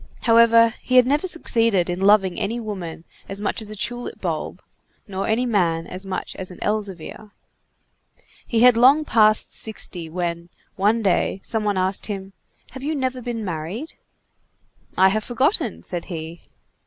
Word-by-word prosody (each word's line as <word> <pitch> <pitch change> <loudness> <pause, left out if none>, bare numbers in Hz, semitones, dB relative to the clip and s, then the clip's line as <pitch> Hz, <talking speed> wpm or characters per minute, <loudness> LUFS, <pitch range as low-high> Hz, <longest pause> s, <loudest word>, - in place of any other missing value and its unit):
However, 230 0 +5
he 255 - -1
had 250 -1 +7
never 290 +7 +1
succeeded 230 - +1
in 180 +1 -3
loving 195 -2 +4
any 230 +4 -2
woman 185 -8 -6 0.3
as 195 - -5
much 205 +2 -2
as 215 - -4
a 215 - -7
tulip 240 +4 -3
bulb, - - -4 0.4
nor 195 -1 -3
any 225 +3 +1
man 170 -8 +1
as 185 +2 -8
much 190 - -4
as 185 - -6
an 180 - -11
Elzevir. 210 -1 -4 1.2
He 225 -2 +1
had 250 -1 +7
long 270 +6 +5
passed 215 -4 +3
sixty, 180 -6 -4
when, 170 0 -4 0.3
one 215 +4 +2
day, 195 0 +1
some 220 -2 -1
one 205 -2 0
asked 185 +1 -1
him: 195 -2 -6 0.4
"Have 265 - -9
you 305 +3 -2
never 260 -2 -2
been 230 -2 -4
married?" 180 - -5 1.0
"I 190 +1 +6
have 215 +2 -1
forgotten," 260 - 0
said 175 -3 -5
he. 165 -1 -7
210 Hz, 160 wpm, -22 LUFS, 185-235 Hz, 1.2 s, had